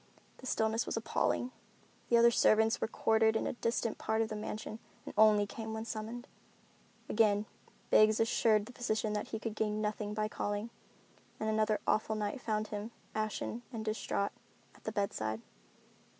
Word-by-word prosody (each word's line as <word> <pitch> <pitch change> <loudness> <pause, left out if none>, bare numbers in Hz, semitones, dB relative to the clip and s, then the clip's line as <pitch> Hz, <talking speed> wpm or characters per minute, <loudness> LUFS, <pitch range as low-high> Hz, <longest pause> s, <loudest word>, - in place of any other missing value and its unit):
The 260 - -8
stillness 220 -1 +1
was - - -2
appalling. 245 +2 0 0.6
The 235 - +6
other 235 0 +7
servants 220 0 +4
were - - +1
quartered 220 -1 +3
in - - +1
a - - -1
distant 230 -1 -1
part 220 +1 +1
of 220 - -4
the 215 - -4
mansion 215 +1 -5 0.3
and - - -7
only 210 -1 +6
came 220 +2 -6
when 220 0 -4
summoned. 230 +3 -5 0.8
Again 210 -1 +3 0.5
Biggs 215 0 +6
assured 225 -2 +3
the 245 - -11
physician 220 -3 -1
that 210 - -2
he 220 - -3
could 220 0 -4
gain 215 -1 0
nothing 210 0 -2
by 215 0 0
calling, 205 +1 -3 0.7
and 220 - -1
another 215 0 +2
awful 215 0 +1
night 210 +4 -2
found 215 -1 -1
him, 210 +1 -4 0.2
ashen 215 +2 -2
and 220 -3 -5
distraught, 215 -2 -1 0.4
at - - -22
the 220 - -1
bedside. 110 - -1
220 Hz, 165 wpm, -33 LUFS, 215-225 Hz, 0.8 s, other